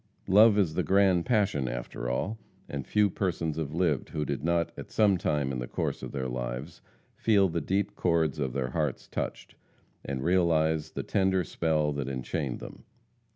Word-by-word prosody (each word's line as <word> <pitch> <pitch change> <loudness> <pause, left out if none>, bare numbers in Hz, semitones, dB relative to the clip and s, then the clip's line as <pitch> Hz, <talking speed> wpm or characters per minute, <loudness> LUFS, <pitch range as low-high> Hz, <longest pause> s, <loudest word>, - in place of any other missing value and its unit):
Love 105 +2 +6
is 90 -7 +2
the - - +1
grand 95 -3 +3
passion 100 - +1
after - - -4
all, 105 - -2 0.3
and 70 -3 -5
few 105 -1 +3
persons 85 -5 -2
have 80 -3 -3
lived 85 -7 +1
who 75 - -2
did - - -3
not 85 0 +1
at - - -8
some 105 -3 +4
time 75 -5 0
in 65 - -3
the - - -4
course - - -2
of - - -6
their 65 -2 -3
lives 60 +5 -5 0.3
feel 100 -4 +3
the 85 -1 -2
deep 95 +6 -1
chords 80 -4 +1
of 65 -3 -1
their 65 -2 -2
hearts 75 -5 -2
touched, - - -5 0.5
and 65 -1 -4
realize 80 -3 +2
the - - -3
tender 95 -2 +1
spell 75 -2 0
that 70 -2 -3
enchained 65 +1 -3
them. - - -10
80 Hz, 180 wpm, -28 LUFS, 70-95 Hz, 0.5 s, Love